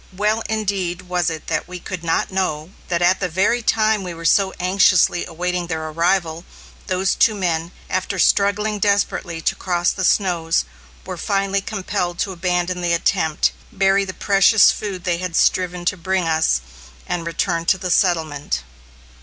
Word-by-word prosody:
Well, 210 +2 +1
indeed, 195 -5 -2
was 180 -1 0
it 160 -1 -6
that - - -2
we 180 0 -7
could 175 0 -7
not 165 +3 0
know 180 -4 -2 0.2
that 175 -1 0
at 185 +2 +3
the 180 - -2
very 195 +8 +1
time 220 -1 +2
we 180 -2 -6
were 165 0 -9
so 190 +4 +3
anxiously 185 -1 +3
awaiting 180 +1 -3
their 160 -1 -3
arrival, 170 0 0 0.4
those 190 +1 +1
two 220 - +3
men, 170 -3 -2 0.2
after 185 +1 -2
struggling 205 +3 +2
desperately 200 -5 0
to - - +1
cross 175 -1 0
the 190 - -4
snows, 175 -4 +1 0.4
were 185 -1 -6
finally 195 +1 0
compelled 185 -4 -3
to 195 - -1
abandon 180 0 -1
the 175 -1 +1
attempt, 165 -2 +1 0.2
bury 195 0 +2
the 185 -1 -6
precious 200 +2 +5
food 195 -4 -5
they 175 -2 -1
had 180 -2 -4
striven 180 0 +1
to 185 - 0
bring 185 0 -1
us, 160 - +2 0.4
and 170 -1 -3
return 170 0 -1
to 190 - +3
the 185 -1 -3
settlement. 155 - 0
180 Hz, 165 wpm, -20 LUFS, 170-195 Hz, 0.4 s, precious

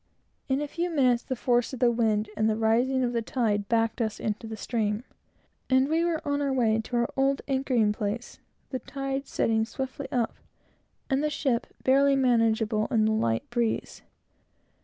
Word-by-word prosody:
In 265 +2 +1
a - - -3
few 340 +4 -2
minutes, 255 -7 +3
the 260 - -4
force 245 +1 +1
of 260 - -5
the 245 -1 +4
wind 220 -2 +1
and 220 +1 +2
the 215 - +1
rising 240 +4 +2
of 245 -1 0
the 235 - 0
tide 215 -4 -1
backed 225 +1 +1
us 220 -1 -2
into 215 +1 -3
the 220 0 -6
stream, 215 -1 -1 0.7
and 260 +1 +4
we 325 +3 +1
were 335 -3 -1
on 285 0 0
our 280 -1 0
way 225 -4 +2
to 245 - -4
our 235 0 0
old 275 +1 +1
anchoring 260 -6 +1
place, 210 +3 -4 0.3
the 260 - -2
tide 275 0 -4
setting 220 -1 +1
swiftly 265 +4 -5
up, 240 -3 0 0.7
and 270 +2 +1
the 305 - +1
ship 265 -5 -1 0.2
barely 275 +1 +4
manageable, 225 -4 +2
in 225 -5 +2
the 220 - +2
light 115 - 0
breeze. 235 -2 -1
240 Hz, 180 wpm, -27 LUFS, 220-270 Hz, 0.7 s, the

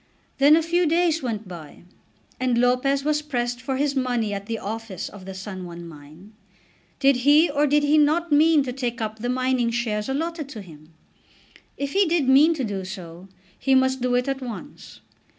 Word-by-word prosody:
Then 285 +3 +7
a 325 - +2
few 345 +1 +1
days 330 0 +2
went 225 -5 -4
by, 170 -4 -11 0.6
and 250 -2 +1
Lopez 250 +3 +2
was 300 0 0
pressed 245 -4 -3
for 265 0 -3
his 285 0 0
money 245 -5 -1
at 200 0 -6
the 225 -1 -3
office 220 -3 -6
of 195 -3 -12
the 190 0 -8
San 190 -1 -7
Juan 170 -1 -9
mine. 155 +6 -14 0.7
Did 275 -2 +4
he 290 +5 +4
or 290 +1 +2
did 295 +1 +2
he 295 +1 +4
not 315 +3 +2
mean 305 0 +5
to 250 -2 -5
take 245 -2 -3
up 220 -1 -4
the 245 +3 -3
mining 255 -1 0
shares 230 -1 -2
allotted 315 +1 -3
to 215 -6 -8
him? 155 -2 -15 0.9
If 280 0 -3
he 395 -1 +3
did 320 -5 +1
mean 295 +5 +5
to 275 - -3
do 200 -4 -3
so, 185 -2 -9 0.3
he 270 -1 +2
must 260 0 +2
do 250 0 +1
it 250 +1 0
at 270 0 -2
once. 255 +4 -9
255 Hz, 195 wpm, -23 LUFS, 210-290 Hz, 0.9 s, Then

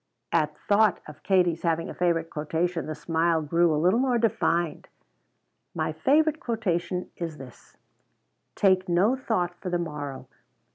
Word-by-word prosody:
At 155 -2 +1
thought 210 -1 +2
of 150 - -12
Katie's 180 -4 +2
having 165 -1 0
a - - -6
favorite 170 -2 0
quotation 165 +3 -2
the 155 - -4
smile 165 +1 0
grew 165 +3 +2
a 150 - +1
little 180 +9 +3
more 255 -2 +2
defined. 180 -7 0 0.9
"My - - -1
favorite 305 +2 +2
quotation 185 -6 -2
is 165 -3 -5
this: 130 -3 -14 0.8
'Take 185 -2 +2
no 190 +9 +3
thought 220 -9 -1
for 185 - -4
the 175 - 0
morrow.' 150 -5 -5
175 Hz, 145 wpm, -26 LUFS, 160-200 Hz, 0.9 s, little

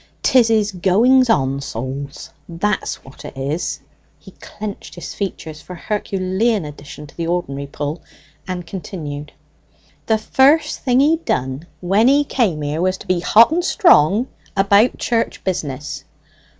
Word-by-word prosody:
"'Tis 250 -3 +5
his 215 -2 +2
goings 225 +8 +3
on, 135 -9 +1
souls, 135 +2 -6 0.2
that's 190 +5 -2
what 135 - -14
it - - -9
is." 140 +5 -3 0.4
He - - -15
clenched 210 -1 -8
his 175 - -7
features 160 -6 -5
for 180 - -10
an 175 - -10
Herculean 200 0 -1
addition 150 0 -10
to - - -17
the 165 -1 -3
ordinary 140 -5 -2
pull, 145 +3 -5 0.5
and 180 -2 -4
continued, 150 -5 -7 0.8
"The 220 - +3
first 285 +8 +3
thing 255 0 +2
he 310 +3 +4
done 135 - -3
when 195 +6 +3
he 285 +2 +5
came 200 - 0
here 150 +3 -2
was 185 +1 +1
to - - -12
be 185 -1 +1
hot 225 - +5
and 345 +2 +1
strong 225 - +4 0.3
about 200 +4 +4
church 230 -1 -1
business." 150 -6 -4
185 Hz, 150 wpm, -19 LUFS, 150-225 Hz, 0.8 s, Tis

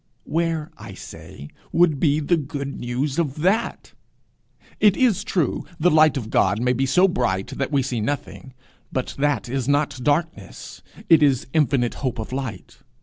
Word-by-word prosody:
Where, 165 -1 -2
I - - -9
say, 70 - -11 0.2
would 165 -5 +3
be 150 -1 +2
the 155 +3 +2
good 140 -2 -5
news 130 +5 -2
of 150 -1 -2
that? 195 +5 0 0.9
It 210 -2 +4
is 245 -8 +2
true, 165 -9 -1 0.2
the 180 +3 +3
light 155 -2 +5
of 115 -4 -5
God 100 +3 +2
may 125 +1 +1
be 135 +2 0
so 180 +8 +4
bright 100 - -1
that 135 +1 -3
we 140 -2 +2
see 125 -3 -2
nothing; 130 +1 -5 0.4
but 130 - -3
that 145 -3 0
is 130 0 -3
not 145 -1 +1
darkness, 145 - -2 0.3
it 165 -2 +6
is 140 -4 +3
infinite 135 -6 +2
hope 130 -2 -2
of 110 +2 -6
light. 130 -9 -6
140 Hz, 165 wpm, -22 LUFS, 125-155 Hz, 0.9 s, it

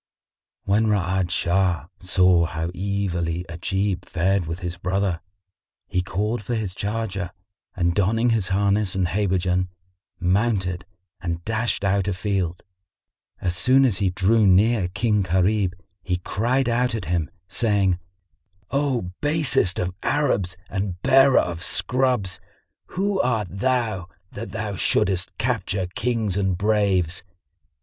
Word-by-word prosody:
When 105 +3 +2
Ra'ad 95 -3 +1
Shah 90 -2 +1
saw 90 -2 +4
how 80 0 -3
evilly 90 -3 -2
Ajib 95 +2 -2
fared 95 +1 0
with 80 +3 -4
his 90 -1 -3
brother, 90 -1 -1 0.7
he 90 - 0
called 105 +6 -2
for 120 +4 -3
his 105 -5 -2
charger 100 -3 -3 0.5
and 85 -1 +1
donning 115 +5 +2
his 110 -5 +1
harness 100 +1 +1
and 95 -2 +1
habergeon, 90 -2 +1 0.5
mounted 95 -2 0 0.4
and 85 -2 -4
dashed 110 -1 -1
out 100 0 +1
a 100 - 0
field. 95 -3 -2 0.8
As 90 -2 -1
soon 130 +9 +4
as 110 -8 +1
he 95 - +2
drew 100 +4 +3
near 100 +1 +4
King 105 +3 +1
Gharib, 95 +1 +1 0.3
he 90 +2 -1
cried 120 +9 0
out 120 0 +1
at 110 - -4
him, 85 -1 -1 0.2
saying, 100 -3 +1 0.7
"O 135 -9 0
basest 145 - +1
of 90 0 -1
Arabs 100 -11 0
and 95 -2 -3
bearer 135 0 +6
of 85 -1 +1
scrubs,[FN#55] 125 -5 0 0.6
who 195 +1 +1
art 110 -6 0
thou, 110 -3 0 0.2
that 115 +3 -7
thou 110 -2 -3
shouldest 90 0 0
capture 105 -5 -1
Kings 110 -5 -1
and 95 -3 +1
braves? 100 -4 +1
95 Hz, 130 wpm, -23 LUFS, 90-110 Hz, 0.8 s, bearer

